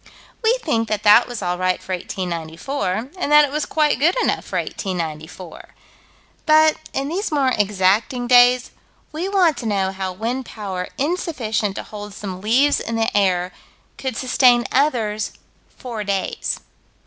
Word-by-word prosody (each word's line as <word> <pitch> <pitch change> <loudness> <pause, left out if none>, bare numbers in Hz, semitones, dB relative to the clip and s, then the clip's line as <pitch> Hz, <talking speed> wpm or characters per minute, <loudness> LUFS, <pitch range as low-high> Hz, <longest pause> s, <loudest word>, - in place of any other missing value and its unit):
We 460 +3 +3
think 230 -8 0
that 210 -1 -2
that 210 +3 +6
was 240 -4 -6
all 180 0 -2
right 185 0 +1
for 190 - -6
1894, 180 - -4
and 295 - -2
that 300 0 +7
it 280 - -7
was 300 0 -2
quite 300 -4 +1
good 325 +6 +3
enough - - 0
for - - -3
1894. 170 -2 -5 0.7
But, 310 0 +5
in 275 +1 -2
these 360 +5 -3
more 275 -4 +2
exacting 210 +5 +1
days, 245 0 +5 0.4
we 335 +5 -3
want 360 -7 +3
to 240 -2 -4
know 195 -2 0
how 190 -1 -4
wind 230 +7 -4
power 190 -4 -5
insufficient 255 - -1
to - - -5
hold 205 -1 -9
some 185 -3 -6
leaves 255 +8 +3
in 230 - -4
the 225 -1 0
air 185 -3 +2 0.5
could 260 -4 -3
sustain 250 -1 +4
others 225 -7 0 0.4
four 235 -4 -7
days. 200 -2 -2
225 Hz, 155 wpm, -21 LUFS, 190-275 Hz, 0.7 s, that